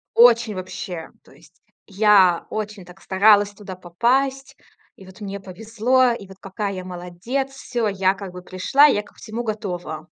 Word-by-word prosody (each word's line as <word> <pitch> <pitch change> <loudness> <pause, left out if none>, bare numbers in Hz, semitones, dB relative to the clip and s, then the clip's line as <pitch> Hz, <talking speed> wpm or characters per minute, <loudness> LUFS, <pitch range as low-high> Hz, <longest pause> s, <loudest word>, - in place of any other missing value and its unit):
очень 230 -3 +5
вообще. 180 -2 -6
То - - -21
есть, - - -22 0.2
я 195 -4 +4
очень, 210 -2 -5
так, 180 +2 -15
старалась 205 +1 +4
туда 200 -2 -9
попасть, 260 +10 -1 0.4
и 190 - -15
вот 190 +4 -15
мне 200 -1 -5
повезло, 225 +7 +1
и 205 -4 -6
вот 190 0 -14
какая 200 +1 -4
я 185 -1 -6
молодец, 180 +10 -4
всё, 245 -4 -3
я 195 -1 +1
как 195 -2 -8
бы 180 - -9
пришла, 185 +11 +3
я 240 -8 +3
ко - - -20
всему 230 +2 -6
готова. 180 -8 -5
200 Hz, 165 wpm, -22 LUFS, 185-230 Hz, 0.4 s, очень